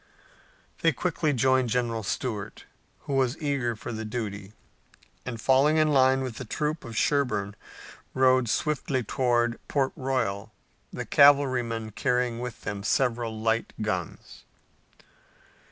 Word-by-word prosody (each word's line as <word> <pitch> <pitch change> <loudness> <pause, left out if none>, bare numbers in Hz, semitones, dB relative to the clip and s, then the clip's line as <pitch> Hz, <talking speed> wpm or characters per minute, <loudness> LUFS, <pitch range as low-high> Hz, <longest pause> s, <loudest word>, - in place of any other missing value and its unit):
They 165 -2 +4
quickly 160 +1 -1
joined 130 -1 +2
General 115 -1 -1
Stuart, 105 0 -4 0.4
who 140 - -5
was 135 +1 +1
eager 140 -6 -1
for 120 +2 -7
the 110 -1 -4
duty, 105 -3 -5 0.7
and 120 -3 -4
falling 135 +6 +3
in 155 0 +3
line 135 -2 +4
with 125 -4 -5
the - - -5
troop 150 +6 -3
of 115 -3 -7
Sherburne 110 -9 0 0.6
rode 130 -2 +3
swiftly 140 -3 -1
toward 120 0 0
Port 135 -2 0
Royal, 115 -6 -2 0.4
the - - -5
cavalrymen 130 -6 +3
carrying 125 +2 0
with 125 -1 -6
them 100 -1 -4
several 115 0 0
light 115 +1 0
guns. 95 -6 -4
125 Hz, 125 wpm, -27 LUFS, 110-135 Hz, 0.7 s, They